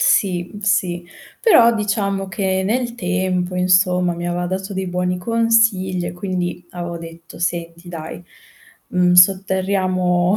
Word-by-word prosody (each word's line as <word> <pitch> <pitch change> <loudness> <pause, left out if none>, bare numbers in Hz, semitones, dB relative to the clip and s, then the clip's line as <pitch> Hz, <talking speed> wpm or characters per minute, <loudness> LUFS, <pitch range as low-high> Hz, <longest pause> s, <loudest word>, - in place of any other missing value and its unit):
Sì 180 -3 +1
sì, 180 -3 0 0.4
però 235 - +6
diciamo 200 -2 -1
che 190 -1 -1
nel 235 +3 -1
tempo, 185 -3 -1
insomma 180 -1 +2
mi 175 +1 -4
aveva 175 0 -2
dato 190 +2 -4
dei 190 0 -3
buoni 180 0 -1
consigli 220 -4 +1
e - - -4
quindi 180 -1 -4
avevo 175 -1 -6
detto: 165 0 -12
"Senti 170 0 -3
dai, 165 0 -7 0.7
mhmm, 180 -1 +2
sotterriamo 185 0 +3
185 Hz, 125 wpm, -19 LUFS, 175-195 Hz, 0.7 s, però